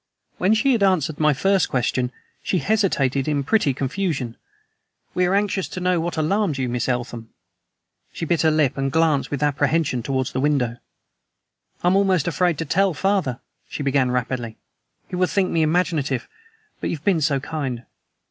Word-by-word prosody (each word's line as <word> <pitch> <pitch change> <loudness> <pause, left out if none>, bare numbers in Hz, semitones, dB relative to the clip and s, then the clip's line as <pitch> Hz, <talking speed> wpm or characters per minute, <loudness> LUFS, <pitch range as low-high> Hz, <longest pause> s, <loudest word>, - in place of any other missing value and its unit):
When 195 +4 +3
she 245 +5 +2
had 235 -4 +2
answered 170 -6 +2
my 155 -1 +4
first 195 +7 +2
question 125 0 0 0.3
she 185 - 0
hesitated 160 - +1
in 145 -2 0
pretty 180 -2 +2
confusion. 135 -3 -2 0.8
"We 180 0 +2
are 190 - +2
anxious 200 -2 0
to - - -6
know 180 -1 +1
what 170 0 -3
alarmed 160 0 +1
you, 130 -1 -1
Miss 120 +1 -1
Eltham." 120 -2 -3 0.8
She - - -5
bit 165 0 +1
her 160 - +4
lip 155 -4 +1
and 135 0 0
glanced 160 -3 +2
with 145 0 -2
apprehension 145 -1 +1
towards 130 +1 -2
the 130 - -2
window. 130 -4 +1 1.1
"I - - +2
am 185 - +3
almost 190 -6 +2
afraid 175 -1 +1
to 165 - -3
tell 190 +3 +2
father," 190 - 0 0.3
she 145 - -4
began 135 -2 +2
rapidly. 125 -2 -2 0.5
"He - - -6
will 180 0 +2
think 190 -2 0
me 165 - +1
imaginative, 155 -5 0 0.5
but - - -2
you - - -1
have 150 - -14
been 185 -6 +3
so 140 -2 +2
kind. 135 -5 -4
155 Hz, 175 wpm, -22 LUFS, 130-180 Hz, 1.1 s, my